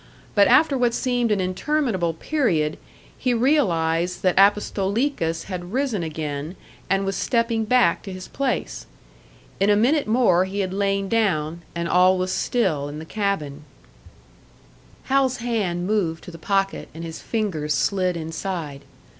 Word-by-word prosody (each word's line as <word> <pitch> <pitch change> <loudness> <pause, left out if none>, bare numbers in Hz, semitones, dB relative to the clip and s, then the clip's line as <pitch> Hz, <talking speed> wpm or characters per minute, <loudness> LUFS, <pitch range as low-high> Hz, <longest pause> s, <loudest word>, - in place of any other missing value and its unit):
But 200 -1 +5
after 275 +3 +5
what 245 -2 +1
seemed 245 -2 0
an 205 - +2
interminable 185 - 0
period, 165 - 0 0.4
he 250 -1 0
realised 180 - +1
that 185 -1 +3
Apostolikas 200 - +1
had 180 0 -7
risen 260 -7 0
again, 155 0 -4 0.3
and 195 0 +1
was 195 0 -2
stepping 230 -2 0
back 240 -6 +3
to 195 - -8
his 185 0 -8
place. 275 -2 -3 0.7
In 195 +2 +3
a 205 - +5
minute 270 +7 +2
more 215 -6 +3
he 200 +2 -3
had 185 -1 -3
lain 195 0 0
down, 175 -7 0
and 170 0 -2
all 185 +2 +4
was 185 0 -1
still 175 -12 0
in 145 - -7
the 160 - -7
cabin. 160 -8 -2 1.4
Hal's 265 -1 +1
hand 210 -8 -2
moved 180 -6 -1
to - - -9
the 165 - -11
pocket, 195 +2 -1
and 165 - -7
his 165 -1 -7
fingers 165 -10 -2
slid 185 +4 0
inside. 160 -3 -5
195 Hz, 145 wpm, -23 LUFS, 170-230 Hz, 1.4 s, But